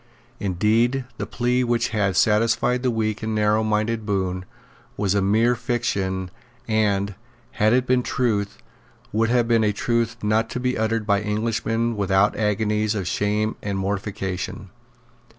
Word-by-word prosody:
Indeed 110 +7 +1
the - - -3
plea 125 +1 0
which 120 -1 +1
had 100 -4 0
satisfied 115 +4 +2
the 130 - +1
weak 110 -2 -1
and 110 0 -2
narrow 105 +1 +2
mind 110 0 +1
of 115 -1 -3
Bohun 95 -3 -2 0.5
was 100 -2 +1
a 100 - +2
mere 110 +5 +3
fiction, 100 -7 -2 0.4
and, 105 -2 +1 0.4
had 110 +1 +2
it 125 +1 +3
been 125 0 +3
a - - -1
truth, 110 -5 -1 0.5
would 115 +2 +1
have 120 -1 +2
been 115 -1 +3
a 105 - +3
truth 115 +2 -1
not 110 +2 +1
to 125 - -4
be 125 0 0
uttered 110 0 0
by 100 -1 +2
Englishmen 115 +2 -1
without 100 0 +2
agonies 105 0 0
of 95 -4 -3
shame 105 +3 0
and 100 -1 -3
mortification. 95 -1 -4
110 Hz, 155 wpm, -23 LUFS, 100-115 Hz, 0.5 s, mere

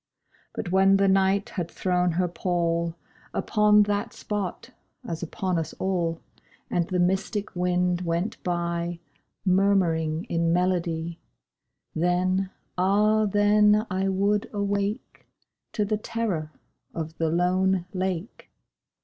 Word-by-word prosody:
But 175 - -4
when 195 +1 +5
the 195 0 +3
Night 195 +3 +2
had 175 -4 -4
thrown 180 -2 0
her 180 +2 +1
pall 170 -1 -1 0.4
Upon 210 -1 +4
that 205 0 -2
spot, 205 -4 -4 0.4
as 165 -1 -4
upon 175 0 -1
all, 170 -3 -1 0.5
And 170 -1 +1
the 185 - -1
mystic 190 +3 0
wind 180 0 +1
went 170 +3 -2
by 170 -1 -2 0.5
Murmuring 180 -4 +2
in 170 -6 0
melody— 170 -2 0 0.7
Then—ah 190 +4 +1
then 210 +1 +4
I 190 +1 0
would 200 +2 +1
awake 200 0 -3 0.5
To 210 - 0
the 210 +1 0
terror 210 -9 -3 0.4
of 160 0 -5
the 165 -1 +1
lone 180 +2 +1
lake. 185 - -4
185 Hz, 110 wpm, -26 LUFS, 170-200 Hz, 0.7 s, when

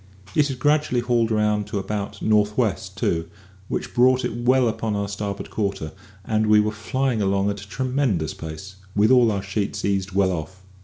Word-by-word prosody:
It 150 -1 +3
had 135 -3 -4
gradually 145 -3 +2
hauled 120 -2 +1
round 105 -1 +1
to 105 0 -3
about 100 0 -4
north 105 -1 +2
west, 100 -5 -1
too, 80 -5 0 0.4
which - - -4
brought 130 +1 +4
it 125 - -3
well 125 +1 +3
upon 110 -1 -1
our 100 0 -1
starboard 100 0 -5
quarter, 100 -7 -2 0.3
and 110 0 +1
we 105 0 +6
were 105 0 +1
flying 115 +2 -1
along 100 0 +1
at 100 -1 -6
a 100 - -12
tremendous 125 - 0
pace, 80 +5 -8 0.2
with 105 +4 +4
all 125 -3 +6
our 100 -2 -2
sheets 100 +1 -2
eased 100 0 0
well 95 -1 +3
off. 90 +3 -6
105 Hz, 190 wpm, -23 LUFS, 100-120 Hz, 0.4 s, we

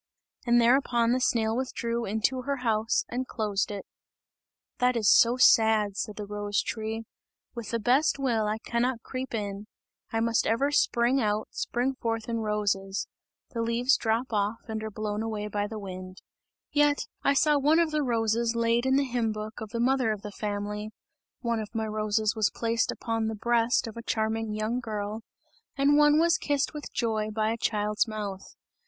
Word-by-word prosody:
And 240 0 +5
thereupon 240 -1 +3
the 255 - +2
snail 225 -2 +1
withdrew 235 -2 -2
into 220 +5 0
her 280 +2 -1
house 220 0 +1
and 255 +1 -3
closed 210 -4 -1
it. 205 -1 -6 0.9
"That 250 0 +3
is 215 -3 +1
so 240 +2 +5
sad," 220 -4 +5
said 210 0 -3
the 210 - -5
rose 205 0 -1
tree, 220 0 -4 0.5
"with 235 -4 -6
the 230 - 0
best 255 +8 +2
will, 235 -6 0
I 215 +1 -1
cannot 235 +1 -1
creep 255 -2 -5
in, 205 -1 -4 0.4
I 225 - 0
must 230 0 +1
ever 275 +6 +1
spring 250 -1 +2
out, 210 -1 0
spring 250 +3 -1
forth 225 -3 -3
in 230 -1 -1
roses. 205 -2 -1 0.4
The 230 - -3
leaves 235 +4 +2
drop 230 +2 -1
off 210 +2 0
and 220 -1 -4
are 220 - -3
blown 210 0 -3
away 215 -2 -3
by 205 0 -1
the 220 0 -6
wind. 185 -2 -8 0.5
Yet, 290 -1 +3 0.2
I 280 - +2
saw 295 +1 +4
one 300 +3 +4
of 335 -2 +2
the 305 0 +1
roses 230 -2 +1
laid 235 +2 +2
in 265 - +3
the 280 - +3
hymn 240 -3 0
book 215 +1 -6
of 220 - -6
the 230 +2 -4
mother 255 -1 +2
of 210 -2 -4
the 210 - -6
family; 210 0 -4 0.5
one 235 -2 0
of 215 +1 -7
my 220 0 0
roses 215 0 0
was 215 -2 +2
placed 230 0 0
upon 225 -1 -2
the 220 - -2
breast 235 +2 +2
of 225 - -7
a 230 - -6
charming 220 -1 -1
young 215 +3 -1
girl, 215 -2 -4 0.6
and 280 +1 +4
one 295 0 +5
was 335 0 +3
kissed 285 0 0
with 300 -1 -7
joy 220 -2 -1
by 215 0 0
a - - -1
child's 210 0 0
mouth. 205 -3 -6
225 Hz, 185 wpm, -28 LUFS, 215-245 Hz, 0.9 s, And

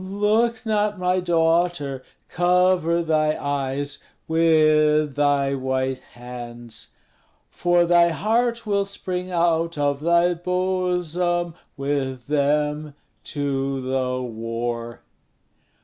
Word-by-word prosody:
Look 215 +4 0
not, 210 -1 0
my 185 0 +1
daughter! 165 -5 +1 0.3
cover 175 -1 +2
thy 155 -1 +1
eyes, 145 0 -2 0.3
With 155 -2 +3
thy 145 -1 +2
white 130 -1 -1
hands, 120 -2 -7 0.6
For 175 0 +2
thy 170 0 +5
heart 230 +7 0
will 200 -1 +1
spring 185 -2 -5
out 170 -2 +1
of 145 -1 0
thy 170 +3 +3
bosom 180 -1 -1 0.2
With 135 -3 -2
them 150 +1 0 0.3
to 135 -2 -2
the 130 -1 -2
war." 115 0 -4
155 Hz, 95 wpm, -23 LUFS, 135-180 Hz, 0.6 s, thy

